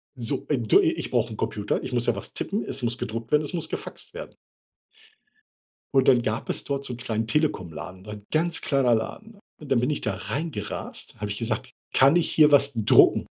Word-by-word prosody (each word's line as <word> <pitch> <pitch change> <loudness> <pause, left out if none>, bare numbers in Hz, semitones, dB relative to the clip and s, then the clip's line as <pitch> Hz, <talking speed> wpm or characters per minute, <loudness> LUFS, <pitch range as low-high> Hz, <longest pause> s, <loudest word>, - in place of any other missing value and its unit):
so, 125 +1 -3
äh, 150 - +2
du, 110 -3 +4
i - - +3
ich - - -5
brauche - - 0
'n - - -9
Computer, 105 -1 -2
ich - - -6
muss 120 -1 +1
ja 120 - +1
was 100 - -6
tippen, 205 +3 -2
es - - -4
muss 120 0 -1
gedruckt 115 +2 -5
werden, 150 0 +4
es 150 - -4
muss 165 - -2
gefaxt - - -6
werden. - - -9 1.6
Und 135 - +5
dann 125 -2 +5
gab 110 +3 -3
es - - 0
dort 140 -1 -2
so 135 - -3
'n - - -7
kleinen 115 -2 -2
Telekomladen, 95 - -2
ein 105 -1 -8
ganz 165 +1 +1
kleiner 135 -4 +2
Laden. 200 - -4 0.2
Und 145 - -10
dann 130 - +4
bin 125 +4 0
ich 150 - -1
da 110 -3 -2
reingerast, 110 - -4
habe 105 -1 -3
ich 100 - -3
gesagt: 110 -1 -2 0.2
„Kann 140 +6 +5
ich 165 - +1
hier 150 -1 +5
was 140 -1 +5
drucken?“ 110 -2 +5
125 Hz, 215 wpm, -25 LUFS, 110-150 Hz, 1.6 s, Und